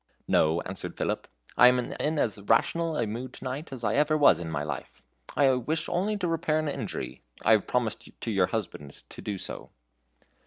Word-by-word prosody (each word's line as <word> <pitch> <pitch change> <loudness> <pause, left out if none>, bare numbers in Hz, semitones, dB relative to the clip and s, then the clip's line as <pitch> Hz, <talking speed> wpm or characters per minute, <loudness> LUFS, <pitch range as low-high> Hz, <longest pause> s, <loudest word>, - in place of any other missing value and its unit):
"No," 80 +2 +3
answered 95 0 -7
Philip, - - -2 0.3
"I 125 - +9
am 125 0 +5
in 150 +5 -2
as 105 -8 0
rational 165 +10 +1
a 120 - +1
mood 120 +4 -5
to - - -11
night 135 +4 -4
as 130 -3 -7
I 105 -1 +1
ever 150 +1 +3
was 145 - +6
in 85 -2 -5
my 75 -3 -2
life. 75 -3 -6 0.3
I 140 -2 +6
wish 150 +6 -1
only 205 +4 0
to 180 - -1
repair 165 -2 +1
an 155 0 0
injury; 145 - -4 0.2
I - - +5
have - - +4
promised - - -1
to 115 - -3
your 95 -3 +3
husband 85 -10 -5
to - - -10
do 100 -2 -3
so." - - -7
125 Hz, 200 wpm, -28 LUFS, 100-155 Hz, 0.3 s, I